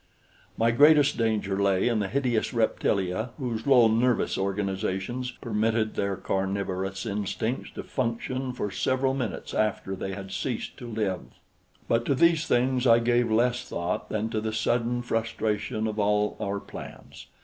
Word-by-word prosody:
My 115 +1 +3
greatest 145 +3 +6
danger 105 -4 0
lay 100 0 +2
in 115 -3 +1
the 100 - 0
hideous 125 -1 0
reptilia 110 -1 0
whose 120 -4 -3
low 125 -4 +7
nervous 115 +2 +2
organizations 100 +4 -2
permitted 110 -2 -1
their 100 -1 -1
carnivorous 95 +1 -2
instincts 105 +3 -2
to - - -5
function 130 +1 -2
for 105 -5 -3
several 130 +4 +1
minutes 125 -6 -4
after 105 -2 0
they 95 +1 -4
had 95 -1 -8
ceased 120 +3 -3
to 125 - -8
live. 105 -5 -2 0.7
But 115 0 +1
to 140 - +2
these 165 +2 +3
things 125 +1 +2
I 115 -1 +7
gave 120 0 +2
less 120 +3 +2
thought 85 0 -3
than 110 +1 -2
to 110 - -1
the 110 0 -3
sudden 120 +2 0
frustration 110 -2 -1
of 110 -1 -2
all 105 0 +2
our 100 -1 -2
plans. - - -11
110 Hz, 150 wpm, -27 LUFS, 100-120 Hz, 0.7 s, low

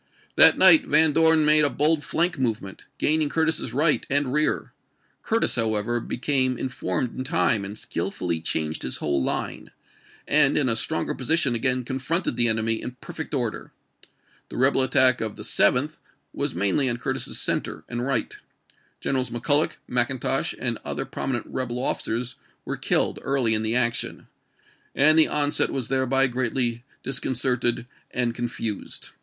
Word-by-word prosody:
That - - +7
night 300 -3 +7
Van 155 0 +4
Dorn 160 0 +4
made 150 0 +5
a 145 - +3
bold 150 +2 +1
flank 170 -2 0
movement, 110 -6 -3
gaining 155 -1 +2
Curtis's 160 -6 -1
right 150 +5 +2
and 140 -2 +1
rear. 150 +1 -1 0.5
Curtis, 225 +1 0
however, 115 0 -1
became 130 +1 0
informed 125 -2 -3
in 130 - -4
time, 130 - +1
and 100 +2 -7
skillfully 85 -4 -4
changed 80 -1 -3
his 65 - -3
whole 70 -3 -1
line, - - -4 0.6
and 145 -2 +4
in 145 - +2
a 115 - +3
stronger 160 +7 -1
position 135 0 0
again 125 +2 0
confronted 135 +4 -2
the 120 0 +3
enemy 110 0 +1
in 125 0 -8
perfect 160 -3 -7
order. 120 -5 -4 0.8
The - - -8
rebel 130 +2 +3
attack 130 -1 +3
of 110 -2 -4
the 105 - -9
7th 125 +10 +1 0.3
was - - -3
mainly 100 - +1
on 120 - -2
Curtis's - - -3
center - - -2
and 120 +1 -4
right. 130 -3 -1 0.7
Generals 130 -3 -1
Mc 120 0 -7
Culloch, 145 +2 +2
Mcintosh, 125 +1 -1
and - - -2
other - - -4
prominent 130 -3 -4
rebel 125 -2 -4
officers 125 -1 -3 0.3
were - - -4
killed - - 0
early 130 -5 +1
in 110 - +3
the 110 +1 -1
action, 120 -1 -1 0.7
and 155 +3 +4
the 160 - +6
on 145 -1 +1
set - - +1
was 130 -4 -4
thereby 135 0 +2
greatly 120 -2 -1 0.2
disconcerted 125 -2 -1 0.2
and 120 -2 -1
confused. 115 -3 -5
130 Hz, 155 wpm, -24 LUFS, 115-145 Hz, 0.8 s, That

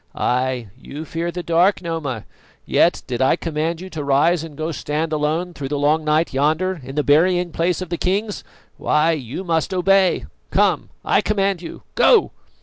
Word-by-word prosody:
Ay, 125 -2 0
you 150 +3 -8
fear 165 +2 -3
the 180 0 -5
dark, 175 +4 +3
Noma; 160 - -4 0.4
yet - - +2
did 125 0 -3
I 130 - +4
command 160 0 -2
you 185 - -8
to 155 -3 -4
rise 150 +5 +2
and 155 -3 -10
go 155 +1 -2
stand 155 +1 -2
alone 155 +4 -1
through 140 -4 -5
the 145 +2 -2
long 150 +2 +2
night 155 +1 +1
yonder 155 +6 0
in 135 +2 -8
the 150 - +1
burying 175 +4 +3
place 175 +3 0
of 180 - -10
kings, 200 +3 -1 0.3
why, 155 +2 +2
you 145 +2 -4
must 170 +1 -1
obey. 190 0 +3 0.2
Come, - - +1 0.2
I - - +3
command 195 -3 0
you 170 - -9
go!" - - +4
160 Hz, 175 wpm, -21 LUFS, 150-180 Hz, 0.4 s, I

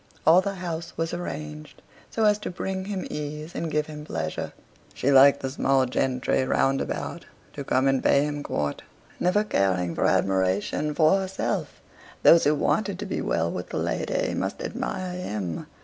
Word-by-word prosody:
All 170 +3 +7
the 195 +1 -3
house 170 -2 -5
was 165 0 -2
arranged 150 -3 -6 0.3
so 225 - -1
as 210 0 +4
to - - -4
bring 190 +1 -4
him 195 -2 -3
ease 150 +2 -5
and 165 - -3
give 150 -1 0
him 150 -1 -8
pleasure. - - -4 0.4
She 140 - +1
liked 140 +1 +7
the 135 - -2
small 135 -1 +2
gentry 130 +1 0
round 135 +1 +2
about - - -4 0.3
to 140 - -5
come 130 0 +2
and 135 -1 +2
pay 140 - +4
him 145 0 -3
court, 75 - -2 0.4
never 185 +4 +2
caring 95 - +1
for - - +1
admiration 95 +10 +1
for 155 +6 +4
herself; 190 0 -3 0.4
those 165 - +7
who 150 +1 +4
wanted 200 +5 0
to 210 - -5
be - - -3
well - - 0
with - - -5
the - - -4
lady - - -1
must - - -3
admire 180 -1 -4
him. 100 - -4
150 Hz, 175 wpm, -26 LUFS, 135-180 Hz, 0.4 s, All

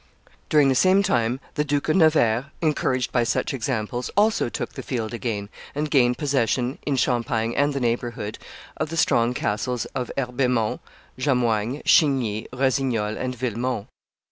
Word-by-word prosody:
During 150 -2 +5
the - - +4
same 185 +8 +4
time 120 - +1
the 150 - 0
Duke 145 -1 -1
of 155 - +2
Nevers, 145 -9 +4
encouraged 130 -5 0
by 120 - +2
such 115 - -1
examples, 120 -1 -2
also 210 - +3
took - - -5
the - - -6
field 115 -3 -3
again, 115 -4 -3 0.3
and 150 0 -2
gained 125 -4 +3
possession, 130 -2 0
in 140 - +1
Champagne 115 -2 0
and 145 +1 +2
the 140 - -2
neighborhood, 120 -3 -2 0.4
of - - -2
the 165 - -5
strong 120 -5 +2
castles 115 +3 -1
of 125 -2 -3
Herbemont, 125 -3 0 0.4
Jamoigne, 125 -1 0
Chigny, 125 -8 +3
Rossignol, 125 -4 0
and 125 0 -3
Villemont. 120 -2 -2
125 Hz, 150 wpm, -24 LUFS, 115-140 Hz, 0.4 s, During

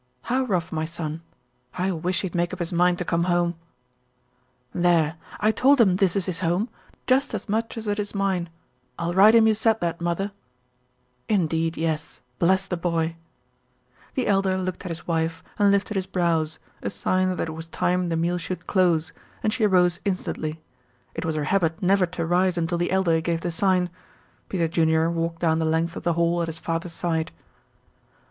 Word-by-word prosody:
"How 260 +2 0
rough, 180 -8 -1
my 155 -1 -1
son? 160 -1 -5 0.6
I 185 +1 +1
wish 180 +1 -1
he'd 190 -4 -4
make 175 +1 0
up - - -4
his 175 -1 -3
mind 180 +1 +3
to 180 - -3
come 170 +1 +1
home." 175 -1 +2 1.2
"There! 170 -3 +2 0.2
I 215 +1 +3
told 275 +5 +4
him 190 -6 +5
this 190 -2 +2
is 195 - 0
his 180 -3 -3
home; 185 +6 0 0.4
just 265 -1 +2
as 205 - -5
much 225 +3 -1
as 220 -1 -5
it 205 0 0
is 205 0 -3
mine. 190 -4 0 0.5
I'll 170 0 -2
write 205 +5 +7
him 225 -1 +7
you 220 - +5
said 220 +1 +2
that, 170 -1 -2
mother." 175 +4 -1 1.0
"Indeed, 165 -5 +1
yes. 160 -2 -2 0.2
Bless 190 +2 +3
the 185 - -2
boy!" 165 -1 -1 1.0
The 260 - 0
Elder 195 -1 +2
looked 185 0 -3
at - - -3
his 165 0 -6
wife 165 -1 -1 0.2
and 205 -1 +5
lifted 200 +1 +1
his 190 -2 -2
brows, 165 -4 0 0.2
a - - -2
sign 185 0 0
that 165 - -2
it - - -5
was 160 +1 -7
time 180 +1 0
the 165 - 0
meal 175 +2 0
should 180 +2 -5
close, 175 -5 +2 0.3
and 215 - +1
she 225 -3 +2
rose 180 -2 +3
instantly. 165 -5 -3 0.5
It - - -4
was 160 -1 -1
her 150 - -1
habit 165 -1 +1
never 190 0 +3
to 170 -1 -3
rise 180 +1 +2
until 170 +1 0
the 175 - 0
Elder 175 -4 +2
gave 165 0 -1
the 175 - -2
sign. 180 0 +1 0.6
Peter 170 -4 0
Junior 160 0 +2
walked 165 0 -2
down 160 -1 +2
the - - +1
length 160 +1 0
of - - -5
the 170 - +1
hall 170 +1 +1
at 170 - -1
his 165 0 -5
father's 165 +1 -3
side. 165 -2 -1
175 Hz, 195 wpm, -24 LUFS, 165-190 Hz, 1.2 s, write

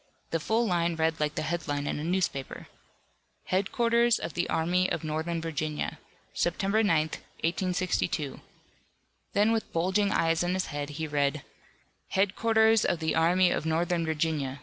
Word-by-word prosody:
The 165 - +1
full 225 +8 +1
line 170 -4 +1
read 160 0 0
like 150 0 -1
the - - -2
headline 155 -3 -2
in 145 - -2
a - - -4
newspaper: 170 -6 -2 0.9
HEADQUARTERS 235 +5 +2
OF - - -5
THE 175 - -1
ARMY 180 +3 +1
OF - - -2
NORTHERN 160 +2 -2
VIRGINIA. 155 -2 -3 0.3
September 195 - +1
9, 165 -8 +3 0.4
1862. 175 -4 -1 0.9
Then 210 +2 +3
with 225 -1 0
eyes - - -30
bulging 190 +5 +1
in 165 +2 +1
his 185 - 0
head 145 -1 -4
he 160 - -2
read: 145 -1 0 0.7
HEADQUARTERS 220 +3 +3
OF 175 - +1
THE 160 -1 -1
ARMY 175 +2 +4
OF 160 - -1
NORTHERN 170 +1 +1
VIRGINIA. 150 -4 -1
170 Hz, 150 wpm, -28 LUFS, 155-190 Hz, 0.9 s, ARMY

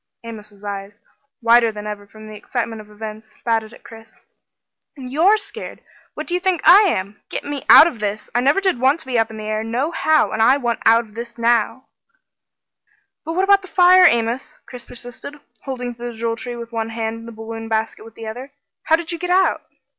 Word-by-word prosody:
Amos's 210 -3 -11
eyes, 200 0 -6 0.5
wider 230 0 +5
than 210 -1 -8
ever 205 -1 -6
from 215 +1 -13
the 215 - -10
excitement 225 +1 -4
of 210 - -17
events, 215 0 -9
batted 225 -2 0
at - - -16
Chris. 225 -1 -15 0.8
"You're 305 +11 +2
scared! 405 -1 -7 0.3
What - - -5
do 350 - -1
you 360 - +1
think 365 -2 -1
I 390 +3 +9
am? 200 - -4
Get - - -4
me 285 -1 -5
out - - +10
of 325 -9 -3
this 210 0 -3
I 240 - +2
never 280 +9 +3
did 375 -10 0
want 270 +5 +3
to - - -12
be 250 -3 0
up 225 0 +1
in 220 - -9
the 215 - -7
air 215 0 -2
nohow, 290 +7 +1
and 220 0 -1
I 255 +5 +5
want 240 -4 -2
out 230 +1 +5 0.3
now!" 235 +1 +1 1.4
"But 325 - -4
what 370 +3 +1
about 395 0 +5
the 375 - -12
fire, 365 0 +6
Amos?" 235 +2 -2
Chris 245 -2 -10
persisted, 245 +4 -10 0.3
holding 250 -3 -4
to 240 0 -13
the 240 - -5
Jewel 230 0 -2
Tree 245 +1 -7
with 235 0 -8
one 225 -1 -3
hand 225 0 -4
and 230 - -11
the - - -8
balloon 225 0 -8
basket 220 0 -2
with 225 0 -14
the 225 - -9
other. 250 +6 -8 0.3
"How 320 - +4
did 335 +1 -5
you 335 - -4
get 355 +1 -4
out?" 375 +1 +2
235 Hz, 210 wpm, -20 LUFS, 220-280 Hz, 1.4 s, out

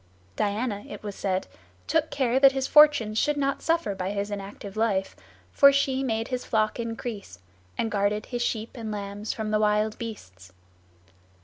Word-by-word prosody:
Diana, 205 - -1
it - - -9
was 205 -1 -5
said, 190 -1 -2 0.4
took 320 -1 +1
care 265 -3 +1
that 275 -1 +7
his 270 -1 -1
fortunes 270 -8 +5
should 295 0 +1
not 275 -1 0
suffer 330 -10 0
by 185 -1 -3
his 200 +1 -3
inactive 200 0 -7
life, 210 -4 0 0.4
for 280 -1 +7
she 275 -1 +1
made 225 -2 -1
his 250 -1 -3
flock 215 0 0
increase, 225 - -5 0.4
and 225 - -1
guarded 205 +1 0
his 245 -1 -4
sheep 225 -2 -2
and 225 -4 -6
lambs 205 +1 -4
from 215 -1 -4
the 215 - +2
wild 210 0 +1
beasts. 95 - -9
220 Hz, 170 wpm, -26 LUFS, 205-255 Hz, 0.4 s, that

